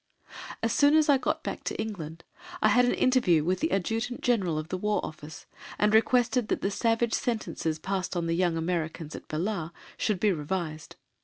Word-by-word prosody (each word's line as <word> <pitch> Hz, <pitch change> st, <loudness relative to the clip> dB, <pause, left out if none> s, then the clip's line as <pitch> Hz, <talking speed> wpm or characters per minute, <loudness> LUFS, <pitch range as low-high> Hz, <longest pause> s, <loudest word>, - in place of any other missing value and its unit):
As 225 Hz, 0 st, +1 dB
soon 290 Hz, 0 st, +5 dB
as 310 Hz, -1 st, +4 dB
I 275 Hz, -2 st, +5 dB
got -, -, -1 dB
back -, -, -5 dB
to -, -, -3 dB
England, 165 Hz, -7 st, -5 dB, 0.4 s
I -, -, +4 dB
had 250 Hz, 0 st, +5 dB
an 245 Hz, -, +2 dB
interview 235 Hz, -, +3 dB
with 180 Hz, +3 st, 0 dB
the 320 Hz, +3 st, 0 dB
Adjutant 225 Hz, +6 st, -1 dB
General 195 Hz, -10 st, +1 dB
at 155 Hz, +1 st, -4 dB
the 185 Hz, -, -2 dB
War 210 Hz, 0 st, +1 dB
Office, 155 Hz, -1 st, -9 dB, 0.3 s
and 210 Hz, 0 st, +2 dB
requested 240 Hz, +1 st, +3 dB
that -, -, -1 dB
the 195 Hz, -, 0 dB
savage 230 Hz, +2 st, +1 dB
sentences 215 Hz, -9 st, -1 dB
passed 185 Hz, +3 st, -3 dB
on 170 Hz, -, -1 dB
the 165 Hz, -, 0 dB
young 175 Hz, -2 st, +1 dB
Americans 165 Hz, -2 st, -3 dB
at -, -, -10 dB
Belah 170 Hz, +1 st, -2 dB, 0.3 s
should 210 Hz, -4 st, 0 dB
be 210 Hz, +1 st, +3 dB
revised. 155 Hz, -1 st, -4 dB
195 Hz, 190 wpm, -28 LUFS, 165-230 Hz, 0.4 s, soon